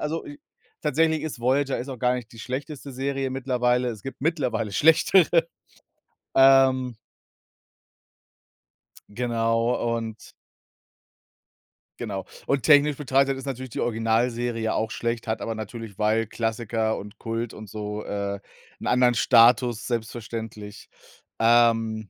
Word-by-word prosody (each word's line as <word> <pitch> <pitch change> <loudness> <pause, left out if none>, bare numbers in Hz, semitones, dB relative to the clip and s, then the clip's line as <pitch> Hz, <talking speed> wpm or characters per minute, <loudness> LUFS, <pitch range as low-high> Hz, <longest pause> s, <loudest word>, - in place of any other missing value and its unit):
also 160 +2 -3
i 145 - -10 0.4
tatsächlich 160 +1 +1
ist 155 -6 -5
Voyager 135 +3 +1
ist 130 - -6
auch 130 -3 -6
gar 125 0 +2
nicht 125 -1 -7
die 115 - -14
schlechteste 140 +3 -6
Serie 135 0 -2
mittlerweile 125 -1 0
es 110 -3 -6
gibt 135 - -8
mittlerweile 125 -9 -1
schlechtere, 165 - +4 0.9
ähm 130 -2 +5 2.1
Genau, 115 +1 0
und 110 -1 -7 1.7
Genau, 100 -5 -4 0.2
und 140 -2 +1
technisch 145 -1 +5
betrachtet 135 -1 +1
ist 135 - -8
natürlich 130 -1 -5
die - - -6
Originalserie 115 0 0
auch 110 0 -1
schlecht, 115 +1 -3
hat 110 - -2
aber 115 - -3
natürlich, 110 -1 -8
weil 110 +2 +2
Klassiker 110 0 -2
und 105 +1 -10
Kult 115 0 -4
und 105 -1 -10
so, 105 0 -5
äh, 100 -1 -3 0.4
'n - - -5
anderen 125 0 +4
Status 120 0 +4
selbstverständlich, 110 -2 -6 0.5
ähm. 115 -2 +3
120 Hz, 120 wpm, -25 LUFS, 110-135 Hz, 2.1 s, ähm